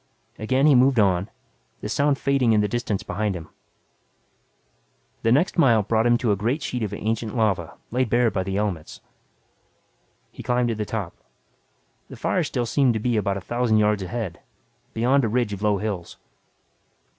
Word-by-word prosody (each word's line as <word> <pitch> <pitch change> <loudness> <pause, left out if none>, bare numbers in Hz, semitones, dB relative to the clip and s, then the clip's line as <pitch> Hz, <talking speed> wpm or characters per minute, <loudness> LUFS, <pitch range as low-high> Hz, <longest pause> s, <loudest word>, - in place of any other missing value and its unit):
Again 130 +6 +1
he 150 - +6
moved 130 -1 +4
on, 95 0 +2 0.5
the - - -4
sound 140 +5 +1
fading 135 -5 +2
in 105 - +4
the 105 - +1
distance 110 -3 -2
behind 105 -2 -2
him. 85 -2 -8 1.7
The 115 - +1
next 165 +8 +2
mile 115 -9 +5
brought 110 +3 +1
him 120 0 +4
to 120 -3 0
a - - +3
great 120 +10 -1
sheet 125 -3 -3
of 105 -3 -2
ancient 110 +3 -3
lava 95 -7 0
laid 125 0 0
bare 120 0 +3
by 95 - -1
the 95 +1 -3
elements. 95 -7 -3 1.3
He - - -10
climbed 125 -1 0
to 115 - -1
the 105 0 -3
top. 100 -5 -4 1.0
The - - -9
fire - - 0
still 120 - -2
seemed 125 0 +2
to - - 0
be 120 +2 0
about 100 -2 0
a - - -6
thousand 120 +2 0
yards 105 -1 +2
ahead, 95 -2 -4 0.6
beyond 130 +5 +2
a - - +2
ridge 120 -2 0
of 100 - -6
low 105 -1 +2
hills. 95 -4 -5
110 Hz, 180 wpm, -23 LUFS, 105-125 Hz, 1.7 s, he